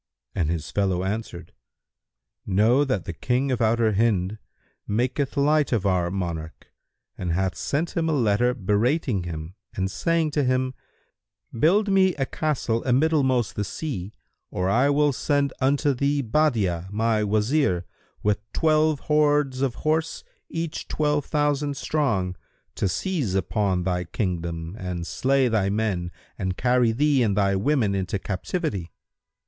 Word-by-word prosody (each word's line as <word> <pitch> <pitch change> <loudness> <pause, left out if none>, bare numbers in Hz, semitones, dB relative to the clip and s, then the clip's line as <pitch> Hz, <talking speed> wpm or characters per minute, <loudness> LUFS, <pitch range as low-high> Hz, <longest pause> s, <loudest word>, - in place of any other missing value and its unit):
and 80 -5 0
his 80 -3 -3
fellow 95 -3 0
answered, 95 -3 -5 0.9
"Know 110 +8 +3
that 130 -10 -1
the 90 - -4
King 125 +9 0
of 120 -2 -1
Outer 110 -1 +2
Hind[FN#169] 105 -1 +1 0.5
maketh 130 +6 -1
light 150 +1 +3
of 110 -5 0
our 90 -3 +2
monarch, 85 -4 -5 0.5
and 90 -2 -1
hath 95 +1 0
sent 160 +4 -2
him 165 -1 +1
a - - +1
letter 120 -1 +2
berating 110 - 0
him 80 0 -6 0.2
and 95 0 -1
saying 165 +8 0
to 145 -1 +1
him, 130 0 +1 0.8
'Build 190 - +3
me 190 -2 +4
a 135 - -1
castle 130 -7 -1
amiddlemost 130 -3 +2
the 105 - -2
sea, 105 - -5 0.3
or 90 +1 -1
I 125 +6 +3
will 145 0 +3
send 140 +1 0
unto 140 +2 +2
thee 140 +2 0
Badi'a 110 - +1
my 110 +1 +1
Wazir, 105 - +1 0.4
with 105 -1 +2
twelve 155 -2 +2
hordes 150 -3 +2
of 130 -3 0
horse, 155 +3 -1 0.3
each 165 -1 -4
twelve 150 -1 0
thousand 145 -1 0
strong, 105 -12 0 0.4
to - - -1
seize 145 - -1
upon 95 -1 0
thy 90 -1 -1
kingdom 85 -2 -3
and 90 -2 -4
slay 135 +6 +1
thy 105 -4 +1
men 100 -4 -1 0.3
and 95 0 -2
carry 125 -1 +3
thee 140 +3 +2
and 105 -4 +1
thy 100 -1 +2
women 110 0 +1
into 95 0 -1
captivity.' 100 - -3
115 Hz, 140 wpm, -24 LUFS, 95-145 Hz, 0.9 s, me